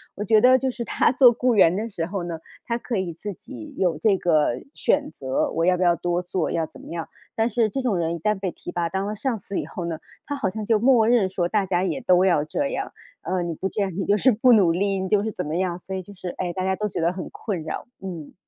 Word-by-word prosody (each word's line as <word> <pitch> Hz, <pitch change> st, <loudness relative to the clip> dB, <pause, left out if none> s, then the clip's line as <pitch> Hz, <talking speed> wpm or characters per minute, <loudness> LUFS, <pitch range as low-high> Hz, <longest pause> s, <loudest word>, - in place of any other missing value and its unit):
我 205 Hz, -, -3 dB
觉 215 Hz, +1 st, +5 dB
得 255 Hz, +3 st, +6 dB
就 260 Hz, 0 st, -1 dB
是 240 Hz, -1 st, -5 dB
他 -, -, +2 dB
做 250 Hz, -1 st, +7 dB
雇 245 Hz, 0 st, +1 dB
员 180 Hz, -4 st, +5 dB
的 220 Hz, +4 st, -3 dB
时 170 Hz, -5 st, -3 dB
候 185 Hz, 0 st, -4 dB
呢， 170 Hz, -2 st, -5 dB, 0.3 s
他 235 Hz, -, -1 dB
可 240 Hz, 0 st, -4 dB
以 185 Hz, -3 st, -2 dB
自 200 Hz, +5 st, -6 dB
己 120 Hz, -9 st, -11 dB
有 180 Hz, -3 st, +1 dB
这 205 Hz, -3 st, +3 dB
个 155 Hz, -8 st, +2 dB
选 295 Hz, 0 st, +1 dB
择， 130 Hz, -1 st, -1 dB
我 165 Hz, +1 st, 0 dB
要 185 Hz, -, +4 dB
不 180 Hz, -, 0 dB
要 175 Hz, -1 st, +5 dB
多 175 Hz, 0 st, -1 dB
做， 180 Hz, -1 st, -2 dB
要 165 Hz, -1 st, 0 dB
怎 -, -, -14 dB
么 -, -, -12 dB
样， 165 Hz, -1 st, -4 dB, 0.3 s
但 225 Hz, +1 st, +1 dB
是 230 Hz, -1 st, +1 dB
这 270 Hz, +6 st, -3 dB
种 235 Hz, -7 st, 0 dB
人 170 Hz, 0 st, -1 dB
一 -, -, -7 dB
旦 210 Hz, +4 st, 0 dB
被 190 Hz, -1 st, -2 dB
提 -, -, -9 dB
拔， 170 Hz, -1 st, -1 dB
当 190 Hz, +3 st, -2 dB
了 210 Hz, -, -3 dB
上 245 Hz, +1 st, -1 dB
司 195 Hz, +1 st, -4 dB
以 -, -, -3 dB
后 175 Hz, -, -6 dB
呢， 165 Hz, -2 st, -4 dB, 0.3 s
他 285 Hz, -, -3 dB
好 200 Hz, -, 0 dB
像 215 Hz, +2 st, -5 dB
就 220 Hz, -1 st, +3 dB
默 240 Hz, -2 st, +4 dB
认 225 Hz, -5 st, +3 dB
说 180 Hz, -2 st, -1 dB
大 205 Hz, -1 st, +1 dB
家 180 Hz, -1 st, 0 dB
也 190 Hz, -, -1 dB
都 185 Hz, -5 st, +4 dB
要 170 Hz, -6 st, +3 dB
这 280 Hz, -, -1 dB
样。 -, -, -4 dB, 0.3 s
呃， 185 Hz, -1 st, -1 dB
你 170 Hz, -, -3 dB
不 190 Hz, +4 st, -3 dB
这 205 Hz, -, -1 dB
样 195 Hz, -, -2 dB
你 195 Hz, -, -1 dB
就 205 Hz, +1 st, +4 dB
是 260 Hz, +4 st, +4 dB
不 240 Hz, +4 st, +4 dB
努 195 Hz, -7 st, +6 dB
力， 195 Hz, +3 st, 0 dB
你 190 Hz, -, -2 dB
就 205 Hz, +2 st, +2 dB
是 220 Hz, -, -2 dB
怎 180 Hz, -, -4 dB
么 155 Hz, -, -3 dB
样， 180 Hz, -2 st, -1 dB
所 185 Hz, +2 st, -7 dB
以 190 Hz, -, -3 dB
就 195 Hz, -, -13 dB
是， 180 Hz, -1 st, -6 dB
哎， 180 Hz, -1 st, -1 dB
大 185 Hz, -, -3 dB
家 190 Hz, 0 st, +1 dB
都 210 Hz, +2 st, -2 dB
觉 -, -, -4 dB
得 170 Hz, +2 st, +1 dB
很 185 Hz, -1 st, -6 dB
困 195 Hz, -7 st, -4 dB
扰， 155 Hz, -, -5 dB, 0.2 s
嗯。 170 Hz, -6 st, -7 dB
190 Hz, 310 characters per minute, -24 LUFS, 175-220 Hz, 0.3 s, 做